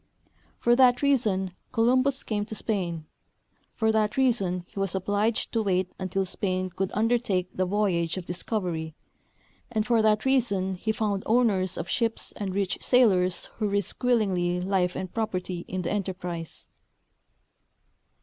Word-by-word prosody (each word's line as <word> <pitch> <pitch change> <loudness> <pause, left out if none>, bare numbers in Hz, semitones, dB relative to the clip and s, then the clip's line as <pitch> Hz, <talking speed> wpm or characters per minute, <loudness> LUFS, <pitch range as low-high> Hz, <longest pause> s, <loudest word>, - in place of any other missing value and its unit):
For 240 0 +3
that 250 0 +5
reason 215 -9 +2 0.2
Columl)us 255 +3 +2
came 210 -2 -1
to 220 - -7
Spain; 175 -8 -2 0.7
for 220 -1 +2
that 215 0 +1
rea 265 -1 +5
son 185 -6 -2
he - - -8
was 195 -2 -1
obliged 205 +4 0
to 225 - +1
wait 185 -3 0
until 190 +1 -1
Spain 185 -1 -2
could 190 +1 -2
undertake 215 -5 0
the 185 0 0
voyage 180 -4 0
of 185 - -5
discovery, 175 -4 -3 0.8
and 215 -2 0
for 235 -2 +3
that 215 +1 +2
reason 225 -8 +2
he 205 +4 -2
found 210 -3 -1
owners 210 -6 +2
of 170 - -4
ships 225 +2 -1
and 195 -2 -5
rich 195 -2 -1
sailors 190 -8 +3
who 215 - 0
risked 200 +2 -2
willingly 190 -8 +2
life 180 -1 0
and 185 - -4
i:)roperty 185 -5 -3
in 185 0 -3
the 170 - -2
enterprise. 180 -4 -4
200 Hz, 150 wpm, -27 LUFS, 185-225 Hz, 0.8 s, that